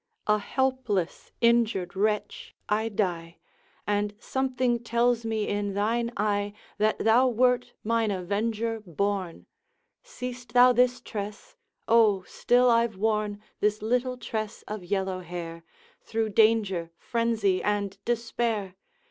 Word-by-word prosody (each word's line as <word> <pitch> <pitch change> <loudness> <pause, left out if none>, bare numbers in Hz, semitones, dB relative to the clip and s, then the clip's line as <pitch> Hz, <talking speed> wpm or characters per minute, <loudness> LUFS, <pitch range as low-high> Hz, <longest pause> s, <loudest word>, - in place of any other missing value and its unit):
A 210 0 +3
helpless 245 -6 -1
injured 230 -6 +2
wretch 210 +2 -1
I 220 +2 +1
die, 175 -5 -2 0.5
And 205 0 0
something 255 0 0
tells 235 0 +1
me 220 -2 -1
in 205 -1 -2
thine 230 +3 0
eye 205 0 0 0.3
That 215 +1 +2
thou 235 +4 +4
wert 250 0 +2
mine 230 0 +1
avenger 215 +4 -1
born. 190 0 -2 0.6
Seest 250 - -8
thou 250 0 +7
this 250 +1 +2
tress? 210 -2 -7 0.3
O. 215 -4 +4
still 245 +6 +2
I 230 0 +4
've 215 -4 -16
worn 210 0 -1 0.2
This 210 0 0
little 250 +3 0
tress 220 -3 -5
of 210 -3 -5
yellow 190 0 -1
hair, 170 -1 -7 0.4
Through 225 -1 -2
danger, 210 -5 +3
frenzy, 225 -5 0
and 205 -1 -1
despair! 230 -4 -1
215 Hz, 120 wpm, -27 LUFS, 200-235 Hz, 0.6 s, thou